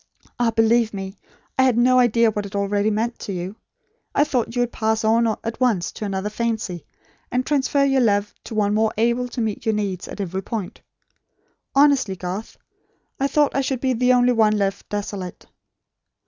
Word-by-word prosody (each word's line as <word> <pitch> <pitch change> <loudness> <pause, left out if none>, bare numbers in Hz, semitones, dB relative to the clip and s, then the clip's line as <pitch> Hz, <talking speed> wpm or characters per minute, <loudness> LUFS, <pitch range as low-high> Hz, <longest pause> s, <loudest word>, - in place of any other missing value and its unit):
Ah, 240 -1 +3
believe 225 0 +2
me, 195 0 -6 0.4
I - - +6
had 255 -3 +3
no 255 +1 +5
idea 235 -2 +4
what 205 -1 -3
it 200 - -10
already 200 +1 +1
meant 225 +3 -1
to - - -5
you. 180 +3 -5 0.6
I 290 - +5
thought 250 -5 -1
you 245 - +2
would 240 - -3
pass 220 0 0
on 230 +1 +3 0.2
at 230 0 -4
once 225 -9 +1
to 215 - -6
another 195 +1 -3
fancy; 215 -7 -3 0.4
and 250 +1 0
transfer 280 -1 +1
your 270 -1 +3
love 205 -3 +1
to 225 - -7
one 205 -1 +2
more 220 +1 +2
able 235 +2 +1
to 245 0 -4
meet 220 -2 -2
your 220 -1 +1
needs, 195 -4 -3
at - - -9
every 190 -1 -3
point. 205 -1 -5 0.9
Honestly, 275 -8 +4
Garth, 185 +4 -6 0.6
I 275 - +2
thought 295 0 +2
I 275 - +2
should 265 -2 -2
be 260 0 +1
the 250 +1 +2
only 250 0 +4
one 215 -2 +3
left 195 -1 -2
desolate. 200 -3 -5
220 Hz, 190 wpm, -22 LUFS, 205-245 Hz, 0.9 s, I